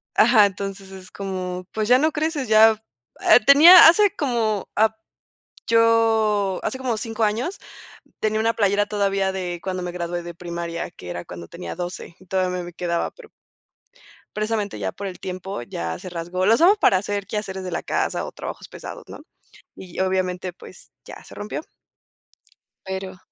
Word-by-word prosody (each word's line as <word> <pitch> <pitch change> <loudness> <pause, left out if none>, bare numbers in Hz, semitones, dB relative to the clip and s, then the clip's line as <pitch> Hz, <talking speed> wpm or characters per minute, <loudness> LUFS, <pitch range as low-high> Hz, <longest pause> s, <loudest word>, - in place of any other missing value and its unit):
Ajá, 220 -2 +6
entonces, 195 0 -5
es 190 -1 -12
como, 185 -2 -5
pues, 215 -1 -2
ya 250 +2 +6
no 310 +3 +2
creces, 305 -3 -2
ya, 220 0 +5 0.4
ah, - - +6
tenía 325 +6 +10
hace 400 +3 +5
como 230 -7 -1
ap 220 +1 +3 0.7
yo, 225 -4 +3
hace 260 - -2
como 250 -4 -2
5 225 +1 -3
años, 230 - -1 0.6
tenía 215 0 0
una 225 +1 +2
playera 205 -2 +2
todavía 195 -2 0
de 180 -2 -4
cuando 185 -1 -3
me 180 0 -4
gradué 175 0 -4
de 170 0 -8
primaria, 170 0 -5
que 90 - -12
era 85 0 -5
cuando 85 -1 -9
tenía 175 -1 -8
12 175 -1 -6
y 185 - -19
todavía 180 -1 -1
me 175 - -9
quedaba, 170 -1 -2
pero - - -15 1.1
precisamente, 215 - -2
ya 95 -2 -3
por 200 - -6
el 185 - -8
tiempo, 185 -5 -6
ya 85 -7 -5
se - - -9
rasgó, 175 +2 -3
la 215 - +5
usamos 350 - +5
para 200 - +4
hacer 200 +1 -3
quehaceres 195 -2 -5
de 180 - -5
la 170 - -2
casa - - -1
o - - -6
trabajos - - -8
pesados, - - -9
¿no?, - - -10 0.5
y 180 -2 -10
obviamente, 185 -1 -1
pues, - - -15
ya - - -11
se - - -14
rompió. 205 +7 -5 1.2
Pero. 190 0 -6
195 Hz, 170 wpm, -22 LUFS, 180-220 Hz, 1.2 s, tenía